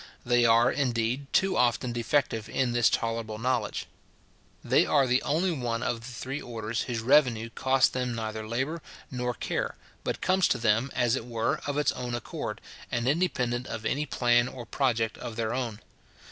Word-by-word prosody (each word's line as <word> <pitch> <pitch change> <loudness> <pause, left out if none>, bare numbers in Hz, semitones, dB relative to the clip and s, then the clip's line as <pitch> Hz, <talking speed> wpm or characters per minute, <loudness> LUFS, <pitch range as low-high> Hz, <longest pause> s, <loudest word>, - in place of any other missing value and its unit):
They 120 0 +4
are, 115 +1 +5
indeed, 125 0 -1
too 195 0 +2
often 120 0 +2
defective 120 -2 0
in 130 0 0
this 120 -1 +4
tolerable 115 -1 -2
knowledge. 125 +2 -1 0.8
They - - +4
are 140 -3 +3
the 125 0 +2
only 170 +5 +1
one 120 -6 -2
of 120 -2 -1
the 115 - -9
three 130 +3 -5
orders 115 -1 -3
whose 120 -3 -3
revenue 115 -3 +3
costs 130 +1 +3
them 125 -2 -2
neither 110 -1 -4
labour 135 +9 -2 0.3
nor 125 -1 -2
care, - - -2 0.3
but - - -2
comes 185 -1 +3
to - - +1
them, 115 +3 +2
as 120 -1 +2
it 120 - -5
were, 115 -2 -1
of 145 0 -1
its 150 - +3
own 120 -1 -4
accord, 120 - -5 0.3
and 120 0 -1
independent 130 -6 0
of 110 0 -5
any 150 +5 0
plan 120 0 +3
or 125 -2 -8
project 115 -4 0
of 120 -2 -6
their 115 0 -1
own. 120 -4 -3
120 Hz, 175 wpm, -28 LUFS, 115-130 Hz, 0.8 s, are